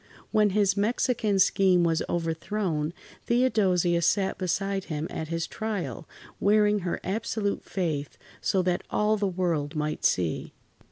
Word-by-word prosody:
When 210 -1 +4
his 200 -1 +2
Mexican 215 0 +1
scheme 185 -1 +4
was 165 -1 +2
overthrown, 165 -1 -1 0.4
Theodosia 195 -8 +2
sat 190 +3 +1
beside 195 +1 -1
him 155 -1 -3
at 160 - -4
his 165 +1 -2
trial, 210 -7 -4 0.3
wearing 210 0 +3
her 180 -2 -3
absolute 210 0 -2
faith, 150 -8 -3 0.2
so 190 -3 +1
that 180 -1 0
all 210 +1 +2
the 205 -1 0
world 170 -5 -1
might 150 0 -2
see. 85 -3 0
185 Hz, 130 wpm, -27 LUFS, 165-210 Hz, 0.4 s, When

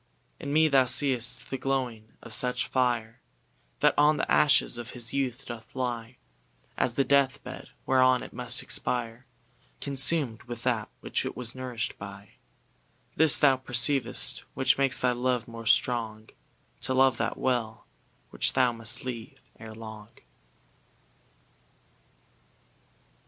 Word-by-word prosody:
In 140 - -5
me 155 +2 +4
thou 135 -3 +4
seeŌĆÖst 125 -2 +2
the 135 - -4
glowing 125 -5 -3
of 115 - -8
such 125 +2 +1
fire, 120 -3 -1 0.6
That - - +4
on 150 +1 +4
the - - -2
ashes 145 -4 +3
of 120 0 -7
his 115 -1 -4
youth 135 -1 -2
doth 115 -1 -10
lie, 120 -1 -4 0.6
As 120 - 0
the 135 - +1
death 140 0 +2
bed, - - -9 0.2
whereon 130 -1 +3
it - - -11
must 125 0 -1
expire, 120 0 -1 0.5
ConsumŌĆÖd 135 -3 +1
with 120 -1 -7
that 115 -5 -1
which - - -2
it - - -6
was 120 -2 -4
nourishŌĆÖd 125 -4 -5
by. 100 0 -10 0.9
This 160 -3 +6
thou 135 -3 +4
perceivŌĆÖst, 130 +1 +1 0.2
which 130 +1 +2
makes 135 -2 +3
thy 125 - +2
love 125 0 -1
more 115 -1 -9
strong, 110 -3 0 0.5
To 130 +1 0
love 130 0 +4
that - - -2
well, 115 -4 -2 0.5
which - - +2
thou 130 -2 +3
must 115 +1 -1
leave 120 -3 -7 0.2
ere 110 0 -10
long. 110 -2 -10
125 Hz, 135 wpm, -27 LUFS, 115-130 Hz, 0.9 s, This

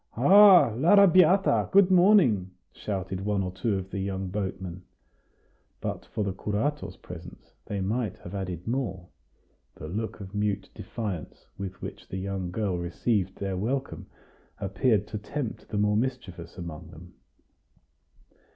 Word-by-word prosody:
"Ha! 185 - +7
l'Arrabiata! 185 - +5
good 195 -1 +5
morning!" 175 - +5 0.2
shouted 95 -2 -4
one 100 -1 0
or 90 - -3
two 100 +2 -1
of 95 0 -6
the 100 - -3
young 95 -1 -3
boatmen. 95 -2 -4 1.0
But - - -5
for 110 - -3
the 100 -2 -2
curato's 105 +10 -2
presence, 90 0 -11
they 100 -2 -3
might 110 +1 -2
have 85 - -9
added 90 -3 -5
more; 100 -8 -3 0.7
the 75 - -8
look 110 +8 -4
of 95 -1 -9
mute 105 -1 -2
defiance 100 -8 -6
with 95 -1 -6
which - - -8
the 95 - -5
young 95 -1 -3
girl 95 -1 -2
received 95 +2 -1
their 95 -1 -3
welcome 130 +8 -3 0.5
appeared 105 +1 +1
to 105 - -4
tempt 120 +3 -5
the 105 - -3
more 105 0 +2
mischievous 105 -9 -4
among 85 -4 -7
them. - - -13
100 Hz, 140 wpm, -27 LUFS, 95-125 Hz, 1.0 s, Ha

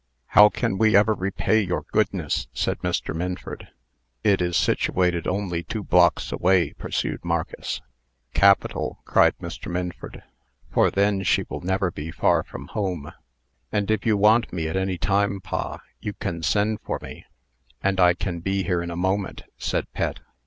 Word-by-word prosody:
"How 105 0 +8
can 95 -2 -2
we 110 -1 +4
ever 105 +2 +5
repay 100 +3 +1
your 90 -3 -2
goodness?" - - 0
said - - -1
Mr. - - -2
Minford. 90 +2 -5 0.6
"It 100 -3 +3
is 90 -1 +1
situated 90 -2 +1
only 90 -3 -1
two 105 +5 -5
blocks 85 -3 +3
away," 90 -3 +2
pursued - - -3
Marcus. - - -3 0.5
"Capital!" 100 0 +3
cried - - +4
Mr. - - -7
Minford; 90 0 -5 0.5
"for - - +4
then 100 0 +1
she - - +2
will - - -6
never 95 0 0
be 75 +1 -6
far 85 0 +2
from 70 -2 -10
home." 90 -8 -3 0.6
"And 105 0 0
if 110 -2 0
you 110 -2 +2
want 110 +4 +4
me 80 -3 -2
at 80 - -3
any 95 -1 0
time, 100 +2 +1
pa, 95 0 -4 0.2
you 105 - -4
can 85 -3 -4
send 105 +6 +1
for - - -3
me, - - -10 0.6
and 95 -1 +1
I 90 -1 +6
can 85 0 -3
be 95 +3 -1
here 90 0 0
in 85 - -4
a 85 - -5
moment," 95 +3 -1 0.2
said - - -1
Pet. - - -2
95 Hz, 165 wpm, -24 LUFS, 85-100 Hz, 0.6 s, How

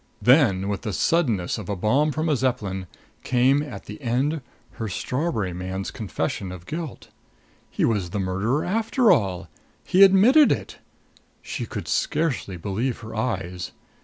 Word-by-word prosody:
Then, 120 -8 +4
with 100 -2 -2
the 105 -4 -4
suddenness 115 - +1
of - - -8
a 100 - -1
bomb 130 +11 +2
from 155 +3 -2
a 155 - +3
Zeppelin, 105 -8 -2 0.4
came, 130 +3 +3
at 145 -3 -7
the 155 - -9
end, 135 +5 0 0.4
her 110 - -2
strawberry 110 - -2
man's 95 +3 -4
confession 105 -1 -3
of 90 -2 -9
guilt. 160 - -6 0.6
He - - 0
was 100 -6 0
the 100 - -3
murderer, 95 +9 0
after 225 +4 +2
all! 95 - +1 0.4
He 185 - +2
admitted 210 +10 +7
it! - - -3 0.6
She - - -5
could - - -6
scarcely 130 - -1
believe 110 +8 -2
her 110 - -8
eyes. 95 -6 -3
115 Hz, 150 wpm, -24 LUFS, 95-150 Hz, 0.6 s, admitted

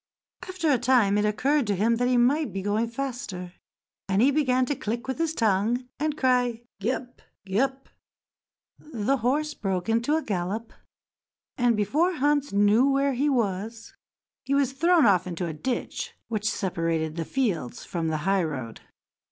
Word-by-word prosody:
After 350 -5 0
a 260 - +3
time 240 -5 +3
it 210 - +1
occurred 265 +5 +1
to 205 - +1
him 225 +5 +2
that 245 +1 +1
he 250 0 +3
might 260 +2 +2
be 190 +1 -4
going 210 +3 0
faster, 235 -8 -5 0.6
and 190 0 +2
he 260 +5 +5
began 260 -3 +2
to 290 - -1
click 235 +1 -4
with 265 +3 -3
his 325 -1 0
tongue, 225 +4 +1
and 305 +1 0
to - - -17
cry, 245 -2 +1 0.2
"Gee 225 +6 0
up! 250 -1 -8 0.2
Gee 195 +2 -1
up!" 270 0 -1 0.9
The 270 -2 -1
horse 290 +6 0
broke 190 -4 -3
into 235 +7 +2
a 320 - -1
gallop, 205 +3 -3 0.8
and 245 -3 +2
before 305 - +1
Hans 290 0 +1
knew 205 +6 +4
where 275 0 +2
he 280 +4 +1
was 225 -2 -2 0.5
he 275 - 0
was 275 -2 +1
thrown 335 +2 +4
off 185 -3 +3
into 175 0 -3
a 165 - -4
ditch 245 +11 -4
which 215 -1 -1
separated 165 -6 -1
the 165 - -2
fields 185 - -2
from 170 -4 -3
the 160 -1 0
highroad. 155 - -1
235 Hz, 170 wpm, -26 LUFS, 195-270 Hz, 0.9 s, he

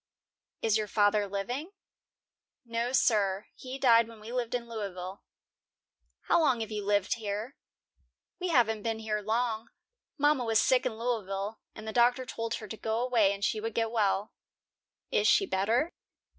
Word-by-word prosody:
"Is 220 -1 +3
your 215 - -2
father 205 0 +2
living?" 245 - -4 0.9
"No, 235 +1 -2
sir; 205 -6 +2
he 260 +1 -7
died 235 -4 +5
when 230 -1 -13
we 215 +2 -9
lived 245 -1 -1
in 240 -1 -3
Louisville." 195 -4 -6 1.0
"How - - +3
long 265 -8 +2
have 220 0 -4
you 210 -1 -3
lived 205 +1 +1
here?" 215 +4 -4 0.8
"We 365 - -2
haven't 230 -9 +3
been 225 +1 -1
here 215 -1 -2
long. 225 +1 -1 0.5
Mama 290 -3 +3
was 225 -1 +2
sick 255 -1 +3
in 220 - -5
Louisville, 215 -3 -2 0.2
and 215 0 -9
the 220 - -4
doctor 245 +2 +3
told 230 -1 -3
her 215 - -7
to 220 - -7
go 220 +1 -1
away, 235 -5 +3
and 200 0 -2
she 215 - 0
would 225 0 -4
get 225 -1 0
well." 205 -2 +1 0.8
"Is - - +3
she 395 - +5
better?" 235 - +1
225 Hz, 165 wpm, -30 LUFS, 210-245 Hz, 1.0 s, died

